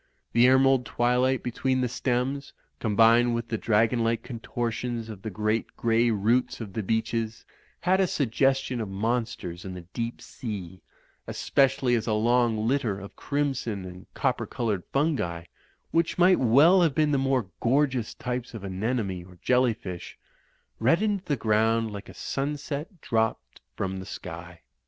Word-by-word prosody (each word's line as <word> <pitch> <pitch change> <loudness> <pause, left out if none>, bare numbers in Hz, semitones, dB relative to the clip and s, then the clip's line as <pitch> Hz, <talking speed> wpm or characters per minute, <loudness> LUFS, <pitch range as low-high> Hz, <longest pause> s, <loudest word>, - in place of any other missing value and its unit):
The 120 +1 +6
emerald 130 0 +5
twilight 125 +2 +1
between 130 +1 0
the 125 - +1
stems, 130 +3 -2 0.3
combined 115 +2 +4
with 115 -1 -4
the 115 - -1
dragon 115 +2 +2
like 115 0 0
contortions 120 -1 -4
of 105 -3 -8
the 110 - -4
great 110 +2 -2
grey 115 +1 +2
roots 115 +4 +1
of 105 -5 -7
the 110 - -2
beeches, 110 +1 -2 0.4
had 185 +1 +3
a 190 - +3
suggestion 135 -2 +1
of 105 - -4
monsters 105 -4 -2
and 95 -1 -6
the 85 - -10
deep 115 0 -3
sea; 95 -6 -7 0.5
especially 135 -2 +2
as 115 -1 0
a 110 - +1
long 115 -1 +2
litter 120 -7 0
of 100 0 -10
crimson 135 -9 -2
and 90 0 -11
copper - - 0
coloured 110 -6 -1
fungi, 135 - 0 0.5
which 165 0 +1
might 180 +1 +5
well 145 +10 +6
have 160 -5 +2
been 150 0 +3
the 140 - +2
more 130 -7 0
gorgeous 130 -2 +1
types 125 -1 -4
of 105 - -7
anemone* 100 -1 -2
or 90 0 -16
jelly 125 -2 +3
fish, 90 -5 -8 0.6
reddened 195 - +2
the 145 -4 0
ground 110 +1 +2
like 100 0 -8
a - - -12
sunset 145 +4 -4
dropped 110 -1 -1
from 95 -1 -3
the 95 - -8
sky. 85 -2 -8
115 Hz, 155 wpm, -27 LUFS, 110-135 Hz, 0.6 s, The